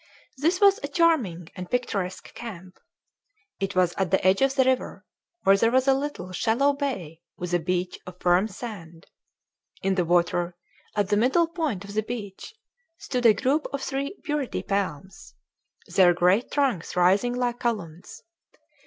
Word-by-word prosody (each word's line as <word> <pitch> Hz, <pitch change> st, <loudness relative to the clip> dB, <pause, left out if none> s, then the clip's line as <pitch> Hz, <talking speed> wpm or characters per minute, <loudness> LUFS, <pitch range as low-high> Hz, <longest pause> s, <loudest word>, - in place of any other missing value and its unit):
This 335 Hz, +6 st, +1 dB
was 400 Hz, -1 st, +5 dB
a 280 Hz, -, -3 dB
charming 275 Hz, -, +1 dB
and 180 Hz, -1 st, -7 dB
picturesque 205 Hz, -7 st, -3 dB
camp. 185 Hz, -6 st, -9 dB, 0.8 s
It 195 Hz, -1 st, -3 dB
was 180 Hz, -1 st, +3 dB
at 190 Hz, -2 st, +1 dB
the 190 Hz, -1 st, +1 dB
edge 190 Hz, +4 st, +4 dB
of 270 Hz, 0 st, +3 dB
the 265 Hz, -, +4 dB
river, 260 Hz, 0 st, -1 dB, 0.4 s
where 195 Hz, -, +6 dB
there 225 Hz, +3 st, +3 dB
was 260 Hz, +2 st, +2 dB
a 270 Hz, -, +6 dB
little, 270 Hz, -10 st, -4 dB
shallow 235 Hz, +10 st, +2 dB
bay 195 Hz, -, -4 dB, 0.2 s
with 180 Hz, 0 st, -5 dB
a 175 Hz, -, +3 dB
beach 180 Hz, +2 st, -2 dB
of 180 Hz, 0 st, -10 dB
firm 180 Hz, +3 st, +3 dB
sand. 180 Hz, -7 st, -9 dB, 0.8 s
In 195 Hz, -, +2 dB
the 185 Hz, -2 st, +1 dB
water, 175 Hz, 0 st, +1 dB, 0.4 s
at 205 Hz, -2 st, 0 dB
the 205 Hz, -, +2 dB
middle 265 Hz, +10 st, +3 dB
point 310 Hz, -, -3 dB
of 200 Hz, -, -9 dB
the 215 Hz, -, +1 dB
beach, 215 Hz, -, -7 dB, 0.4 s
stood 250 Hz, -3 st, 0 dB
a 215 Hz, -, +6 dB
group 285 Hz, +4 st, 0 dB
of 280 Hz, -1 st, -4 dB
three 280 Hz, +7 st, -3 dB
burity 295 Hz, -4 st, -2 dB
palms, 190 Hz, -3 st, -4 dB, 0.5 s
their 180 Hz, -2 st, +4 dB
great 180 Hz, +7 st, +2 dB
trunks 265 Hz, -, -1 dB
rising 195 Hz, +7 st, +3 dB
like 245 Hz, -1 st, -1 dB
columns. 185 Hz, -9 st, -4 dB
205 Hz, 160 wpm, -25 LUFS, 180-265 Hz, 0.8 s, where